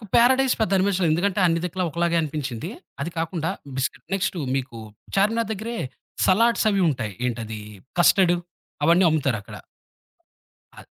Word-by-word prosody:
నాకు -, -, -11 dB
'పారాడైస్' 260 Hz, +2 st, +5 dB
పెద్ద 220 Hz, -, +1 dB
అనిపించలేదు 190 Hz, -3 st, +2 dB
ఎందుకంటే 195 Hz, +4 st, +1 dB
అన్ని 165 Hz, -1 st, +1 dB
దిక్కులా 180 Hz, +1 st, -2 dB
ఒకలాగే 170 Hz, +2 st, 0 dB
అనిపించింది. 145 Hz, -2 st, -4 dB, 0.3 s
అది 165 Hz, +5 st, -2 dB
కాకుండా 165 Hz, 0 st, -2 dB, 0.3 s
బిస్కట్ 135 Hz, 0 st, -2 dB
నెక్స్టు 190 Hz, -1 st, -1 dB, 0.2 s
మీకు 130 Hz, -3 st, -4 dB, 0.4 s
'చార్మినార్' 220 Hz, +3 st, +2 dB
దగ్గరే 220 Hz, +3 st, -5 dB, 0.5 s
సలాడ్స్ 230 Hz, +4 st, +3 dB
అవి 200 Hz, -1 st, +1 dB
ఉంటాయి, 115 Hz, -8 st, -2 dB
ఏంటది 115 Hz, -3 st, -4 dB, 0.4 s
కస్టర్డు 175 Hz, +1 st, +5 dB, 0.5 s
అవన్నీ 170 Hz, +4 st, +5 dB
అమ్ముతారక్కడ. 135 Hz, -10 st, -1 dB, 1.2 s
ఆహ్ -, -, -13 dB
175 Hz, 130 wpm, -24 LUFS, 145-200 Hz, 1.2 s, పారాడైస్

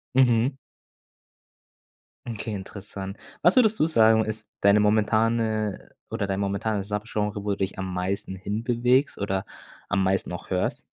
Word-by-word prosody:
Mhm. 125 Hz, 0 st, +4 dB, 1.7 s
Okay, 115 Hz, -1 st, -4 dB
interessant. 100 Hz, 0 st, -7 dB, 0.2 s
Was 175 Hz, +3 st, +5 dB
würdest 220 Hz, -4 st, +4 dB
du 155 Hz, -, +4 dB
sagen, 110 Hz, -7 st, +5 dB
ist 110 Hz, 0 st, -5 dB
deine 100 Hz, +1 st, +5 dB
momentane, 110 Hz, 0 st, +2 dB
äh, -, -, -20 dB
oder 100 Hz, -, -1 dB
dein 95 Hz, 0 st, -1 dB
momentanes 100 Hz, 0 st, -1 dB
Subgenre 105 Hz, -1 st, -2 dB
wo 105 Hz, -, -1 dB
du 100 Hz, -, -1 dB
dich 95 Hz, 0 st, -2 dB
am 95 Hz, -1 st, -3 dB
meisten 95 Hz, +1 st, -2 dB
hinbewegst 120 Hz, +7 st, +1 dB
oder 95 Hz, -1 st, -1 dB, 0.4 s
am 100 Hz, -1 st, +1 dB
meisten 95 Hz, 0 st, 0 dB
auch 90 Hz, -, -8 dB
hörst? 90 Hz, -1 st, -1 dB
105 Hz, 140 wpm, -25 LUFS, 100-115 Hz, 1.7 s, Was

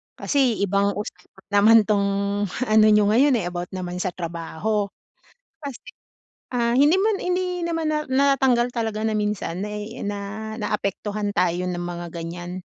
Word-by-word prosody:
Kasi 260 Hz, -7 st, +1 dB
ibang 200 Hz, +1 st, +1 dB
usapan 205 Hz, -2 st, -9 dB
naman 210 Hz, +3 st, +7 dB
tong 200 Hz, -1 st, +1 dB, 0.6 s
ano 215 Hz, 0 st, +6 dB
nyo 210 Hz, -1 st, +5 dB
ngayon, 265 Hz, +4 st, +4 dB
eh, 210 Hz, -7 st, -1 dB
about 175 Hz, 0 st, -4 dB
naman 180 Hz, -1 st, -4 dB
sa 185 Hz, -, 0 dB
trabaho. 175 Hz, +5 st, -2 dB, 0.7 s
Kasi, 280 Hz, -4 st, -6 dB, 0.7 s
ah, 235 Hz, -1 st, +1 dB
hindi 295 Hz, +8 st, +5 dB
naman 425 Hz, +1 st, +2 dB
hindi 360 Hz, +1 st, 0 dB, 0.2 s
naman 330 Hz, -2 st, -1 dB
na 305 Hz, 0 st, 0 dB
natanggal 265 Hz, -3 st, +3 dB
talaga 220 Hz, -2 st, -2 dB
na 220 Hz, -, 0 dB
minsan 210 Hz, -3 st, -2 dB
na 210 Hz, -, -4 dB, 0.3 s
na 205 Hz, 0 st, -3 dB, 0.4 s
naapektuhan 210 Hz, 0 st, -2 dB
tayo 180 Hz, -1 st, +1 dB
ng 180 Hz, -1 st, -3 dB
mga 175 Hz, -1 st, -5 dB
ganyan 175 Hz, +2 st, -6 dB
210 Hz, 145 wpm, -23 LUFS, 180-245 Hz, 0.7 s, naman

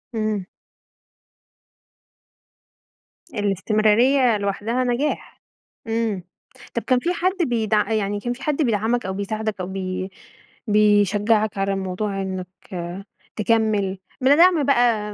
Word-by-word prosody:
إمم. 215 Hz, -3 st, -1 dB, 2.9 s
الاستمرارية 215 Hz, +5 st, +3 dB
لوحدها 205 Hz, +5 st, -1 dB
نجاح. 250 Hz, +4 st, -2 dB, 0.5 s
إمم. 225 Hz, -4 st, -1 dB, 0.5 s
طب 235 Hz, -, -1 dB
كان 255 Hz, -2 st, +2 dB
في 350 Hz, +6 st, -1 dB
حد 370 Hz, +2 st, 0 dB
بيدع 220 Hz, -3 st, +1 dB
يعني 205 Hz, -2 st, 0 dB
كان 240 Hz, +3 st, -2 dB
في 265 Hz, +3 st, -12 dB
حد 300 Hz, -1 st, 0 dB
بيدعمك 230 Hz, -1 st, +1 dB
أو 190 Hz, -, -2 dB
بيساعدك 215 Hz, +1 st, -3 dB
أو 180 Hz, -, -4 dB
بي 190 Hz, 0 st, -4 dB, 0.6 s
بيشجّعك 210 Hz, +1 st, +3 dB
على 195 Hz, 0 st, 0 dB
الموضوع 195 Hz, +1 st, -3 dB
إنّك 185 Hz, -1 st, -4 dB, 0.9 s
تكمّل 210 Hz, -3 st, +1 dB, 0.2 s
من 270 Hz, +3 st, +5 dB
دعم 345 Hz, -3 st, +5 dB
بقى 235 Hz, -6 st, +2 dB
215 Hz, 105 wpm, -22 LUFS, 200-240 Hz, 2.9 s, من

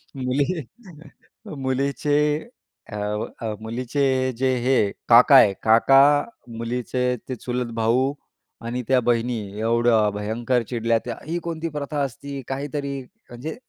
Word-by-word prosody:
मुली 130 Hz, +1 st, 0 dB, 1.2 s
मुलीचे 140 Hz, +2 st, 0 dB, 0.7 s
अ, -, -, -6 dB, 0.5 s
अ, -, -, -4 dB, 0.2 s
मुलीचे 120 Hz, +5 st, -3 dB, 0.4 s
जे 130 Hz, +1 st, +1 dB
हे 125 Hz, -6 st, +2 dB, 0.2 s
काका 120 Hz, +4 st, +7 dB
आहे. 110 Hz, -7 st, +7 dB
काका 115 Hz, +5 st, +6 dB, 0.6 s
मुलीचे 120 Hz, +2 st, -3 dB, 0.3 s
ते 130 Hz, -, -2 dB
चुलत 125 Hz, 0 st, -4 dB
भाऊ 120 Hz, +5 st, +1 dB, 0.5 s
आणि 120 Hz, +2 st, -3 dB
त्या 130 Hz, -1 st, +4 dB
बहिणी 120 Hz, 0 st, +1 dB, 0.2 s
एवढं 115 Hz, -1 st, +3 dB
भयंकर 115 Hz, +4 st, -1 dB
चिडल्या 115 Hz, -1 st, +1 dB
त्या 120 Hz, -2 st, -4 dB
"ही 165 Hz, +3 st, -2 dB
कोणती 165 Hz, -1 st, -4 dB
प्रथा 145 Hz, -1 st, -3 dB
असती 140 Hz, +1 st, -5 dB
काहीतरी" 140 Hz, 0 st, -3 dB, 0.3 s
म्हणजे 120 Hz, +7 st, -6 dB
125 Hz, 120 wpm, -23 LUFS, 115-140 Hz, 1.2 s, काका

